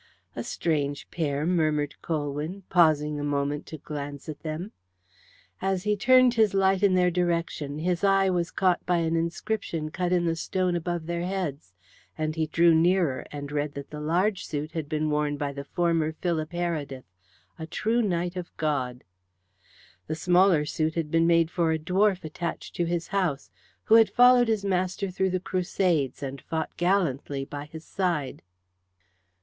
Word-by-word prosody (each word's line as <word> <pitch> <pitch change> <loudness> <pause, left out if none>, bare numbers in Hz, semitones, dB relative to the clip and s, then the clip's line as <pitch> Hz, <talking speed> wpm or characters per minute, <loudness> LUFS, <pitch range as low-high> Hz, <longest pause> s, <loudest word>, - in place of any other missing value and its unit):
"A - - -3
strange 145 -3 -2
pair," 145 -3 -1
murmured 155 -4 +1
Colwyn, 155 +4 -3
pausing 150 -4 +3
a - - -3
moment 145 0 -1
to 155 - -7
glance 145 -1 -7
at 155 -2 -6
them. 165 +6 -5 0.9
As 190 -1 0
he 210 0 +1
turned 255 +3 +5
his 220 -4 +3
light 195 0 +3
in 200 -2 +4
their 180 -1 +3
direction 170 -4 -1
his 175 +3 -1
eye 195 -1 +4
was 175 -2 0
caught 185 -2 +1
by 180 -1 +3
an 165 -1 0
inscription 165 -1 -2
cut 180 +1 -2
in 175 -1 +2
the 165 -1 +1
stone 180 +2 -1
above 175 -1 -2
their 170 +1 -2
heads, 170 - -4 0.4
and 155 0 -2
he 160 -1 0
drew 170 +2 +4
nearer 165 -4 +2
and 145 -1 -6
read 145 0 -2
that 140 0 -8
the 150 - -6
large 180 +7 0
suit 150 +1 -4
had 160 -3 -4
been 155 -1 0
worn 150 -1 0
by 145 -1 -3
the 140 0 -6
former 165 0 0
Philip 160 -1 -2
Heredith, 155 -7 -3 0.5
"A 160 - -5
True 225 +8 0
Knight 175 -4 -1
of 180 -2 -5
God." 130 -5 -2 1.0
The - - -2
smaller 175 -1 +4
suit 155 +1 -1
had 160 -3 -2
been 165 0 +3
made 165 -1 +3
for 170 -2 +1
a - - +1
dwarf 185 +4 +1
attached 165 +2 -5
to 175 - +1
his 170 0 -2
house, 165 - -1 0.3
who - - +2
had 225 -1 +7
followed 245 0 +6
his 215 -3 0
master 185 0 -1
through 190 +1 0
the 185 0 -1
Crusades, 175 -6 0
and 135 -1 -5
fought 160 -1 -4
gallantly 150 -7 0
by 145 +1 -7
his 160 +1 -11
side. 170 -8 -2
165 Hz, 170 wpm, -26 LUFS, 150-185 Hz, 1.0 s, had